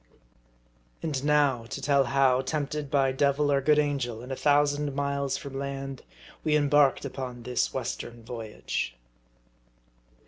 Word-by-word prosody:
AND 145 -5 -2
now 145 -5 +3
to 115 - -6
tell 140 -1 +3
how, 130 0 +3
tempted 145 +1 -3
by 135 -2 +3
devil 140 +2 +2
or 140 -1 +3
good 150 +2 +4
angel, 135 -6 -1
and 125 - -8
a - - -1
thousand 145 0 +2
miles 140 -1 -1
from 135 -1 -6
land, 135 -1 -5 0.4
we 155 -1 +2
embarked 145 -2 +3
upon 125 -3 -6
this 125 0 0
western 120 -2 -5
voyage. 115 -2 -4
140 Hz, 135 wpm, -28 LUFS, 130-145 Hz, 0.4 s, good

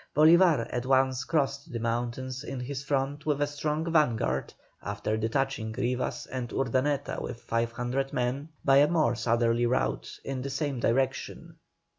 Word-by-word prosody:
Bolívar 160 -4 +6
at 125 +1 -3
once 130 -1 +3
crossed 140 -3 -1
the 120 - -3
mountains 120 +3 -2
in 135 -2 -5
his 135 +2 -4
front 140 +2 -1
with 145 -2 +1
a 145 - +3
strong 150 +2 -2
vanguard, 115 - +1 0.3
after 105 +1 -2
detaching 110 0 -1
Rivas 125 +1 -2
and 125 -2 -5
Urdaneta 135 +2 0
with 115 - -5
500 120 +4 -1
men, 130 +5 -2 0.2
by 135 -1 +6
a 145 +1 +6
more 155 -6 +2
southerly 120 +1 +2
route, 130 +2 -1
in 135 -2 -4
the 140 - -4
same 140 -1 -2
direction. 130 +3 -1
130 Hz, 150 wpm, -28 LUFS, 120-140 Hz, 0.3 s, Bolívar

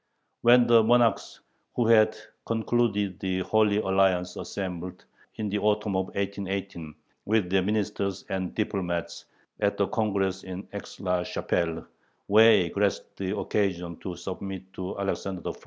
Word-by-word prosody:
When 120 +1 +6
the 120 -1 +6
monarchs 115 -1 +2 0.3
who 120 - +2
had 110 -1 +5 0.3
concluded 110 -4 0
the 95 -1 -1
Holy 105 +2 +2
Alliance 95 -3 +2
assembled, 90 -1 -6 0.3
in 110 - -3
the 105 +1 -1
autumn 105 -1 +1
of 95 0 0
1818, 95 -5 -4 0.3
with 105 -4 +1
their 95 0 +4
ministers 100 -1 -2
and 95 -2 -3
diplomats 90 -5 -2 0.3
at 100 -1 +1
the 100 - +2
Congress 100 -4 -1
in 95 +1 -7
Aix 100 - -8
la 90 -2 0
Chapelle, 85 -2 -2 0.4
Way 105 -4 +6
grasped 100 +1 -1
the 95 +2 -2
occasion 90 -5 -1
to 90 -2 -6
submit 95 +1 -7
to 95 0 -5
Alexander 95 -2 -3
I. - - -4
100 Hz, 140 wpm, -27 LUFS, 95-105 Hz, 0.4 s, When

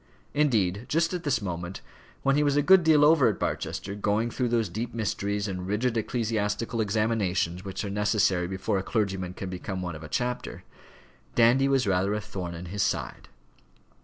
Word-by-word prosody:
Indeed, 115 -8 +1
just 165 +3 +1
at 180 - -2
this 135 -8 0
moment, 90 0 -5 0.4
when 135 0 +3
he 150 - +3
was 145 -1 +2
a 145 - +3
good 190 +3 +6
deal 155 -2 +5
over 150 -4 +5
at 110 - 0
Barchester, 100 - -3
going 105 +3 0
through 125 0 -1
those 115 -2 +1
deep 115 +6 -5
mysteries 100 -2 -1
and 90 -2 -4
rigid 115 +4 0
ecclesiastical 110 0 -1
examinations 100 -5 0
which 95 +1 -4
are - - -3
necessary 100 -3 +1
before 95 +1 -1
a - - -4
clergyman 95 -4 -2
can 95 -1 -5
become 95 0 -4
one 85 -2 -4
of 75 - -9
a 75 - -9
chapter, 125 +5 -3 0.7
Dandy 120 +4 +5
was 135 -3 +2
rather 100 +1 +1
a - - -1
thorn 90 -4 -6
in 85 +2 -7
his 100 +3 -3
side. 105 - -2
105 Hz, 185 wpm, -27 LUFS, 95-120 Hz, 0.7 s, good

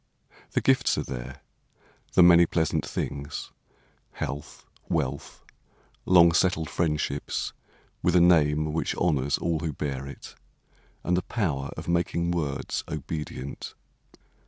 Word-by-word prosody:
The - - +2
gifts - - +3
are - - 0
there, 65 +2 -7 0.7
the 90 - +7
many 85 -1 +7
pleasant 80 -2 0
things: 70 0 -5 0.6
Health, 70 +2 -6 0.2
wealth, 70 -4 -2 0.6
long 85 -2 +7
settled 80 -2 +1
friendships, 75 -3 -1 0.5
with 90 - +2
a - - +7
name 75 -3 +4
Which 80 - -1
honors 70 -5 +1
all 85 -2 -1
who 80 -1 -3
bear 70 -1 -4
it, 70 - -10 0.7
and 90 - +1
the 90 - +1
power 75 -13 -2
Of - - -7
making 85 0 0
words 75 -6 -2
obedient. 75 -2 -6
80 Hz, 120 wpm, -27 LUFS, 70-85 Hz, 0.7 s, the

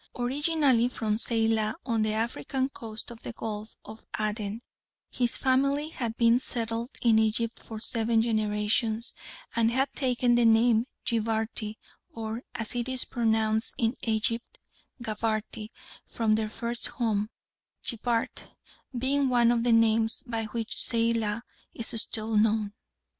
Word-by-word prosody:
Originally 270 -1 +2
from 220 -4 -1
Zeilah 225 -1 +1
on 230 -3 +1
the 215 0 +1
African 255 +4 -1
coast 225 -3 -8
of 230 - -11
the - - -6
Gulf 215 -1 -6
of 220 +1 -10 0.2
Aden, 215 0 -2 0.5
his 245 -1 0
family 275 +3 +2
had 235 -7 -4
been 235 +1 +5
settled 230 -1 -2
in 225 -2 +5
Egypt 220 +1 0
for 220 -1 -8
seven 225 0 +1
generations, 215 +1 +1 0.4
and 230 -1 +3
had 265 +3 0
taken 250 -2 +2
the 240 0 +4
name 225 +1 +4 0.2
Jibarty, 220 -1 -1 0.4
or, 225 +1 -4
as 225 -2 +2
it 240 +1 -1
is 260 -1 0
pronounced 220 -2 +1
in 230 0 +1
Egypt, 230 - -1 0.5
Gabarty, 215 -1 -2 0.4
from 225 -2 +1
their 215 0 0
first 235 +2 -2
home, 215 -3 -1 0.5
Jibart 235 0 -2 0.5
being 270 +2 +1
one 240 -1 +4
of 235 -1 +1
the 240 - +3
names 225 0 +3
by 230 -3 -2
which 225 +1 -4
Zeilah 230 -1 +2 0.3
is 230 -1 +1
still 220 -1 -2
known. 210 -1 +2
230 Hz, 135 wpm, -28 LUFS, 220-240 Hz, 0.5 s, been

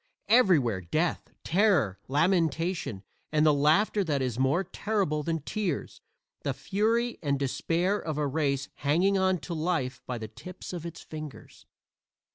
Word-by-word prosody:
Everywhere 165 - +4
death, 155 - -1
terror, 175 - +2
lamentation 165 - +1 0.3
and 155 0 +3
the 155 - +6
laughter 160 +9 +3
that 150 -5 0
is 125 -2 -2
more 135 +8 +2
terrible 195 -8 -1
than 165 0 -2
tears 190 -4 -3 0.4
the 140 -2 -2
fury 220 - 0
and 140 -3 0
despair 170 +8 0
of 155 -2 -4
a 150 - +1
race 140 -1 0
hanging 170 +8 +2
on 190 0 +3
to 175 - -5
life 155 -6 -1
by 125 - -3
the 110 -1 -6
tips 145 +13 -9
of 170 -1 -4
its 170 - -9
fingers. 155 -7 -10
155 Hz, 145 wpm, -28 LUFS, 140-185 Hz, 0.4 s, the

